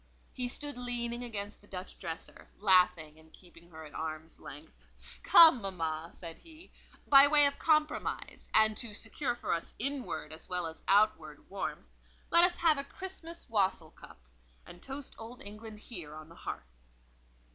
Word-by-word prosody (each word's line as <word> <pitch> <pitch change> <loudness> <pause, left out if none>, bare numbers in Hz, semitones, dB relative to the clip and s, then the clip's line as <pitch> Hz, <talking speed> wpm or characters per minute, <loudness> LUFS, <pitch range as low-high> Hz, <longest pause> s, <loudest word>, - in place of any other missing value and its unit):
He 250 -1 -3
stood 290 +1 -4
leaning 240 -1 -4
against 205 -4 -7
the 205 - -21
Dutch 185 -1 -8
dresser, 165 -2 -7
laughing 180 -6 +3
and 160 0 -20
keeping 170 -1 -18
her 160 -1 -11
at 150 - -13
arm's 160 0 -6
length. 150 +3 -13 0.4
"Come, 320 -8 +8
mamma," 165 -4 -4
said 165 -2 -10
he, 325 +1 -17 0.3
"by 275 0 +8
way 295 0 +7
of 280 0 +1
compromise, 310 -1 -1
and 220 0 +4
to 225 -4 -6
secure 240 +3 -3
for - - -2
us 165 - -4
inward 275 - -4
as 160 - -8
well 180 -1 -2
as 160 0 -8
outward 195 -7 +2
warmth, 195 - -5 0.4
let 340 0 +8
us 355 0 +4
have 320 -4 +3
a - - -2
Christmas 340 +1 -8
wassail 190 -8 0
cup, - - -15 0.5
and 175 - -12
toast 270 +1 -6
Old 230 +2 -8
England 215 +1 -10
here, 175 -10 -7
on 155 0 -11
the 165 - -15
hearth." - - -8
210 Hz, 165 wpm, -31 LUFS, 165-270 Hz, 0.5 s, Come